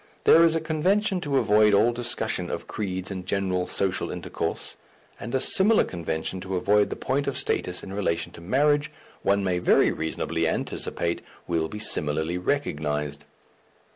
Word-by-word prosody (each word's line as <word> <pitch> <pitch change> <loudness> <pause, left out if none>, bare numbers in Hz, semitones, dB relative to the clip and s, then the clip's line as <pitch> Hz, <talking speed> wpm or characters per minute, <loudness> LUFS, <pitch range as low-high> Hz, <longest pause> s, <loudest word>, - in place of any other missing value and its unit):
There 165 - +7
is 165 -1 +4
a - - +2
convention 185 +5 +1
to 140 -4 0
avoid 105 -3 +4
all 110 +4 +4
discussion 120 0 -2
of - - -4
creeds 95 -2 -4
in 95 -1 -5
general 90 -2 -1
social 95 -1 -1
intercourse; - - -4 0.4
and 120 - -4
a - - +3
similar 210 - +4
convention 85 +1 -4
to 95 0 -4
avoid 100 +3 +3
the - - -3
point 140 +2 -1
of - - -1
status 90 0 0
in 95 - -7
relation 95 -5 -1
to - - -12
marriage, 145 - +2 0.3
one 100 0 +2
may 90 -2 0
very 90 - +4
reasonably 80 0 -2
anticipate, 85 +1 -2 0.2
will 80 -2 0
be 105 - -7
similarly 80 -4 -1
recognized. 75 - -2
100 Hz, 160 wpm, -25 LUFS, 85-135 Hz, 0.4 s, There